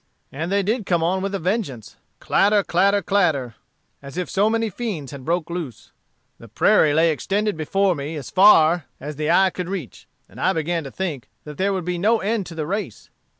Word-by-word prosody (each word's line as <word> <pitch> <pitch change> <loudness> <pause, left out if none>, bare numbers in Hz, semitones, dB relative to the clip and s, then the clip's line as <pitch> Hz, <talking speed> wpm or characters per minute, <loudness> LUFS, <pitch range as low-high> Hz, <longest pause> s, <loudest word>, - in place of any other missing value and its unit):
And 160 +6 -4
they 200 0 +2
did 215 +1 -1
come 170 -2 +1
on 185 +3 0
with 195 +1 -2
a - - 0
vengeance, 175 - -3 0.2
clatter, 205 +1 +2
clatter, 200 +4 +2
clatter, 155 - +1 0.5
as 140 +3 -10
if 180 - -3
so 205 +3 +2
many 225 0 0
fiends 180 - -5
had 140 -2 -9
broke 165 +2 -1
loose. 165 - -6 0.5
The 115 - -13
prairie 155 - +3
lay 160 +2 +3
extended 205 +6 -1
before 190 +5 +1
me 145 +1 -5
as 145 -4 -7
far 175 -5 +5
as 145 +1 -7
the 155 0 -2
eye 190 +2 +4
could 180 -1 -5
reach, 175 - -7 0.2
and 120 +8 -12
I 190 - +2
began 165 0 -2
to 135 - -7
think 155 -9 -5
that 150 -1 -10
there 195 +1 +1
would 185 -3 -3
be 180 -1 -2
no 220 +5 +3
end 210 -1 -1
to 165 - -9
the 155 -2 -3
race. 190 - -5
175 Hz, 205 wpm, -22 LUFS, 150-200 Hz, 0.5 s, far